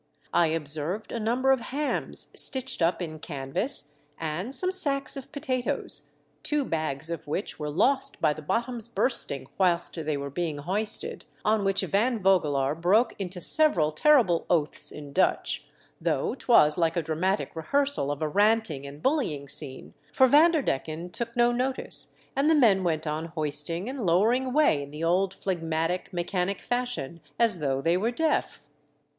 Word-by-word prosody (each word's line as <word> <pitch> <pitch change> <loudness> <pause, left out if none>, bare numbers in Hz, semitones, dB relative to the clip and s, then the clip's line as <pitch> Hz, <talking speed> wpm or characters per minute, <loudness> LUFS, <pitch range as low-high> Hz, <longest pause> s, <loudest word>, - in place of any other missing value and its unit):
I 170 - +3
observed 160 +5 -1
a 235 - -4
number 245 +5 +1
of 265 - +3
hams 285 +5 -2
stitched 260 -4 +5
up 170 +2 +1
in 155 -2 -7
canvas, 145 - +1 0.2
and 170 - -3
some 370 0 0
sacks 285 -8 0
of 270 -2 -8
potatoes, 255 - -3 0.3
two 295 -2 -1
bags 155 - -3
of 165 -3 -6
which 170 +6 -4
were 150 -1 -4
lost 265 - +1
by 150 - +2
the 155 - -10
bottoms 235 - -2
bursting 235 - -2
whilst 175 -2 +2
they 155 -3 -3
were 140 0 -6
being 160 -1 -3
hoisted, 210 - -3 0.2
on 215 -1 +2
which 195 0 +1
Van 230 +5 0
Vogelaar 150 -9 +1
broke 190 +9 +2
into 185 -2 -5
several 180 - +6
terrible 220 - +3
oaths 150 -3 +1
in 145 -2 -10
Dutch, 190 - 0 0.3
though - - -1
'twas 180 - +3
like 165 0 0
a 170 - 0
dramatic 170 +7 -2
rehearsal 275 - 0
of 145 +2 -4
a - - 0
ranting 205 -6 +1
and 145 +2 -12
bullying 205 - -1
scene, 135 -1 -3 0.2
for 260 - +4
Vander 305 +3 +4
decken 160 - -4
took 235 +5 -5
no 240 0 +3
notice 255 +2 0 0.3
and 275 +3 +2
the 320 - +4
men 215 -9 +4
went 160 -3 -1
on 155 +1 -3
hoisting 160 +3 -2
and 260 -2 -5
lowering 215 +9 +2
away 255 - +2
in 140 - -8
the 150 +3 -7
old 185 +3 +1
phlegmatic, 165 0 -3
mechanic 180 +2 -2
fashion 245 - -4 0.2
as 225 -6 +2
though 135 -2 -2
they 165 +1 +2
were 205 +6 0
deaf. 300 - -2
180 Hz, 160 wpm, -26 LUFS, 155-245 Hz, 0.3 s, several